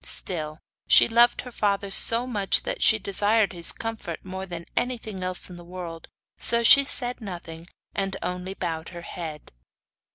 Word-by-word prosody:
Still, 155 Hz, -4 st, -2 dB, 0.3 s
she -, -, +6 dB
loved 235 Hz, +1 st, +3 dB
her 250 Hz, -, -11 dB
father 200 Hz, -3 st, -2 dB
so 230 Hz, +4 st, +6 dB
much 205 Hz, -6 st, 0 dB
that -, -, -5 dB
she 220 Hz, -, +5 dB
desired 205 Hz, +1 st, +2 dB
his 170 Hz, -1 st, +2 dB
comfort 225 Hz, -8 st, -7 dB
more 190 Hz, +1 st, -7 dB
than 170 Hz, -2 st, -8 dB
anything 225 Hz, -6 st, -3 dB
else 185 Hz, 0 st, -2 dB
in 180 Hz, -, -11 dB
the 175 Hz, -, -12 dB
world, 170 Hz, -2 st, -9 dB, 0.3 s
so 235 Hz, 0 st, +1 dB
she 280 Hz, +4 st, +7 dB
said 245 Hz, -3 st, +3 dB
nothing, 170 Hz, -4 st, -9 dB, 0.3 s
and 195 Hz, -1 st, -3 dB
only 180 Hz, +1 st, -5 dB
bowed 165 Hz, -3 st, -5 dB
her 175 Hz, -1 st, -10 dB
head. 160 Hz, -4 st, -8 dB
190 Hz, 165 wpm, -24 LUFS, 175-225 Hz, 0.3 s, she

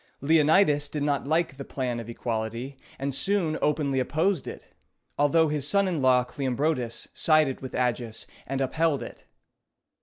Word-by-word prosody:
Leonidas 150 Hz, 0 st, +3 dB
did 150 Hz, -1 st, -3 dB
not 145 Hz, -1 st, 0 dB
like 160 Hz, -3 st, 0 dB
the 140 Hz, -, -6 dB
plan 125 Hz, -3 st, -3 dB
of 115 Hz, 0 st, -8 dB
equality, 115 Hz, +3 st, -4 dB, 0.2 s
and 140 Hz, +1 st, -3 dB
soon 180 Hz, 0 st, 0 dB
openly 140 Hz, -3 st, +1 dB
opposed 160 Hz, +5 st, 0 dB
it, -, -, -8 dB, 0.5 s
although 160 Hz, +3 st, +3 dB
his 150 Hz, -2 st, -1 dB
son 200 Hz, +4 st, +2 dB
in 170 Hz, -6 st, -1 dB
law 130 Hz, -1 st, +4 dB
Cleombrotus 130 Hz, -1 st, -2 dB
sided 155 Hz, -4 st, +2 dB
with 130 Hz, -, -7 dB
Agis, 120 Hz, -2 st, -2 dB, 0.2 s
and 135 Hz, +1 st, -2 dB
upheld 155 Hz, +2 st, +1 dB
it. -, -, -11 dB
140 Hz, 150 wpm, -26 LUFS, 130-155 Hz, 0.5 s, law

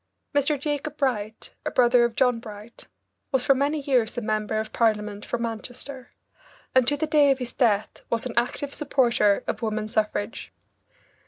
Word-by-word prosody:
Mr. 285 Hz, 0 st, +2 dB
Jacob 295 Hz, +1 st, -3 dB
Bright, 220 Hz, -6 st, -2 dB
a -, -, -1 dB
brother 245 Hz, -1 st, +4 dB
of 235 Hz, -1 st, -3 dB
John 250 Hz, -3 st, +3 dB
Bright, 215 Hz, 0 st, -11 dB, 0.4 s
was 265 Hz, -3 st, +2 dB
for 275 Hz, -, +5 dB
many 285 Hz, +3 st, 0 dB
years 250 Hz, -4 st, +1 dB
member 215 Hz, -2 st, -1 dB
of 220 Hz, 0 st, -5 dB
Parliament 210 Hz, -2 st, 0 dB
for -, -, -2 dB
Manchester, 245 Hz, +3 st, -6 dB, 0.6 s
and 260 Hz, -2 st, +4 dB
to 290 Hz, +2 st, +3 dB
the 315 Hz, -, 0 dB
day 300 Hz, -2 st, +4 dB
of 270 Hz, -, +3 dB
his 250 Hz, -2 st, -5 dB
death 220 Hz, -5 st, +1 dB
was 230 Hz, +1 st, -1 dB
an 250 Hz, -, -4 dB
active 250 Hz, +4 st, -1 dB
supporter 240 Hz, -8 st, +2 dB
of -, -, -3 dB
woman 215 Hz, -1 st, -2 dB
suffrage. 215 Hz, 0 st, -2 dB
240 Hz, 165 wpm, -25 LUFS, 220-275 Hz, 0.6 s, for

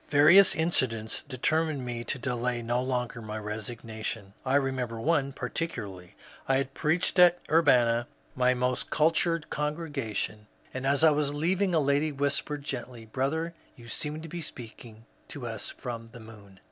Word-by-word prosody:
Various 155 Hz, +7 st, +7 dB
incidents 125 Hz, -9 st, 0 dB
determined 145 Hz, +1 st, -1 dB
me 120 Hz, -1 st, -4 dB
to -, -, -1 dB
delay 125 Hz, -1 st, -2 dB
no 120 Hz, +2 st, 0 dB
longer 125 Hz, -2 st, -2 dB
my 110 Hz, 0 st, -5 dB
resignation. 110 Hz, -1 st, -6 dB
I 135 Hz, +1 st, +1 dB
remember 130 Hz, -4 st, 0 dB
one 140 Hz, +1 st, +1 dB
particularly. 115 Hz, -, -5 dB, 0.3 s
I 135 Hz, -, +3 dB
had 135 Hz, 0 st, -2 dB
preached 165 Hz, +5 st, +1 dB
at 175 Hz, 0 st, +7 dB
Urbanna, 120 Hz, -7 st, +4 dB, 0.3 s
my 125 Hz, 0 st, +3 dB
most 125 Hz, 0 st, -1 dB
cultured 165 Hz, +1 st, +1 dB
congregation, 145 Hz, -9 st, -3 dB, 0.3 s
and 130 Hz, +1 st, -3 dB
as 140 Hz, +2 st, +2 dB
I 160 Hz, -, +8 dB
was 145 Hz, -1 st, +1 dB
leav 165 Hz, +6 st, 0 dB
ing 190 Hz, -4 st, +2 dB
a -, -, +5 dB
lady 145 Hz, +2 st, +2 dB
whispered 140 Hz, +1 st, -1 dB
gently, 120 Hz, -4 st, -6 dB
^^ 110 Hz, -, -23 dB
Brother, 160 Hz, +7 st, -1 dB, 0.2 s
yon 120 Hz, -1 st, -13 dB
seemed 150 Hz, +4 st, -2 dB
to -, -, -7 dB
be 175 Hz, +2 st, -5 dB
speaking 115 Hz, -5 st, -7 dB, 0.2 s
to 135 Hz, -4 st, -8 dB
us 115 Hz, -3 st, -3 dB
from 115 Hz, -3 st, -7 dB
the 120 Hz, -, -10 dB
moon." 105 Hz, -4 st, -14 dB
130 Hz, 160 wpm, -28 LUFS, 115-150 Hz, 0.3 s, I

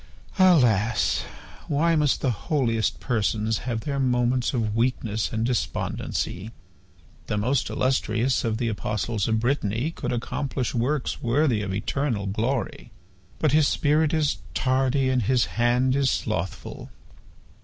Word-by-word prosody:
Alas! 120 Hz, -, +3 dB, 0.4 s
Why 165 Hz, +3 st, +2 dB
must 150 Hz, -3 st, +2 dB
the 130 Hz, -, +1 dB
holiest 115 Hz, -2 st, -1 dB
persons 110 Hz, -2 st, 0 dB
have 115 Hz, -2 st, -2 dB
their 140 Hz, +3 st, -3 dB
moments 125 Hz, -1 st, +1 dB
of 110 Hz, -5 st, -1 dB
weakness 115 Hz, -3 st, 0 dB
and 110 Hz, 0 st, -1 dB
despondency? 110 Hz, -4 st, -2 dB, 0.8 s
The 105 Hz, -, -1 dB
most 125 Hz, +5 st, 0 dB
illustrious 130 Hz, -1 st, 0 dB
of 110 Hz, -2 st, -1 dB
the 120 Hz, 0 st, -1 dB
apostles 105 Hz, -1 st, -2 dB
of 110 Hz, -1 st, +1 dB
Brittany 120 Hz, +2 st, 0 dB
could -, -, -4 dB
accomplish 125 Hz, +1 st, -2 dB
works 125 Hz, +4 st, -1 dB
worthy 120 Hz, -2 st, +2 dB
of 100 Hz, -2 st, -3 dB
eternal 110 Hz, +2 st, -1 dB
glory... 110 Hz, +4 st, -2 dB, 0.5 s
But 155 Hz, -, +1 dB
his 150 Hz, 0 st, +4 dB
spirit 150 Hz, 0 st, +2 dB
is 155 Hz, -3 st, +1 dB, 0.2 s
tardy 130 Hz, +1 st, +1 dB
and 130 Hz, -1 st, +2 dB
his 120 Hz, +2 st, +2 dB, 0.2 s
hand 125 Hz, +2 st, +3 dB
is 140 Hz, -1 st, +2 dB
slothful. -, -, -3 dB
125 Hz, 130 wpm, -25 LUFS, 110-140 Hz, 0.8 s, his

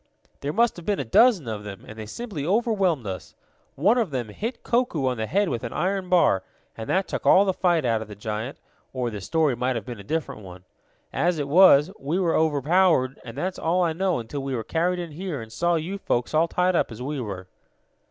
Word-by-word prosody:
"There 140 Hz, -, -3 dB
must 235 Hz, +4 st, +2 dB
have 175 Hz, -, -10 dB
been 205 Hz, -1 st, +1 dB
a 135 Hz, -, -2 dB
dozen 190 Hz, -, +4 dB
of 105 Hz, -2 st, -4 dB
them, 100 Hz, -2 st, -9 dB
and 110 Hz, -, -9 dB
they 110 Hz, -1 st, -8 dB
simply 200 Hz, -, -6 dB
overwhelmed 195 Hz, -, +1 dB
us. 95 Hz, -2 st, -6 dB, 0.4 s
One 205 Hz, -, +3 dB
of 220 Hz, -6 st, 0 dB
them 125 Hz, -6 st, -3 dB
hit 225 Hz, -, -5 dB
Koku 235 Hz, -, 0 dB
on 125 Hz, -2 st, 0 dB
the 110 Hz, 0 st, -2 dB
head 200 Hz, -, +1 dB
with 120 Hz, -8 st, -3 dB
an 115 Hz, -, -5 dB
iron 190 Hz, 0 st, -1 dB
bar, 170 Hz, -, +4 dB, 0.3 s
and 110 Hz, -, -7 dB
that 190 Hz, +1 st, +1 dB
took -, -, -4 dB
all 195 Hz, -, +6 dB
the 190 Hz, -, +1 dB
fight 175 Hz, -6 st, +1 dB
out 115 Hz, -2 st, +1 dB
of 110 Hz, -, -7 dB
the 105 Hz, -, -9 dB
giant, 110 Hz, +5 st, -5 dB, 0.4 s
or 125 Hz, -2 st, -2 dB
the 105 Hz, -2 st, -6 dB
story 155 Hz, -, +1 dB
might 125 Hz, +2 st, -1 dB
have 110 Hz, -4 st, -4 dB
been 120 Hz, -4 st, -7 dB
a -, -, -9 dB
different 155 Hz, -2 st, -3 dB
one. 90 Hz, -2 st, -11 dB, 0.5 s
As 175 Hz, 0 st, +1 dB
it 145 Hz, -2 st, -2 dB
was, 165 Hz, 0 st, +6 dB
we 145 Hz, +6 st, -2 dB
were 175 Hz, -4 st, +1 dB
overpowered, 155 Hz, -2 st, +2 dB
and 115 Hz, +2 st, -9 dB
that's 185 Hz, +5 st, -3 dB
all 175 Hz, +3 st, +1 dB
I 165 Hz, -2 st, +1 dB
know 185 Hz, +1 st, 0 dB
until 125 Hz, +4 st, -5 dB
we 135 Hz, -1 st, -3 dB
were 115 Hz, -, -3 dB
carried 175 Hz, +7 st, 0 dB
in 170 Hz, -2 st, -5 dB
here, 170 Hz, -1 st, -5 dB
and 110 Hz, -1 st, -9 dB
saw 175 Hz, +6 st, +1 dB
you 175 Hz, +5 st, -3 dB
folks 120 Hz, -8 st, -1 dB
all 160 Hz, +2 st, +3 dB
tied 180 Hz, +2 st, +1 dB
up 165 Hz, -, +1 dB
as 110 Hz, -, -9 dB
we 145 Hz, 0 st, -3 dB
were." 95 Hz, -5 st, -6 dB
155 Hz, 235 wpm, -25 LUFS, 120-185 Hz, 0.5 s, all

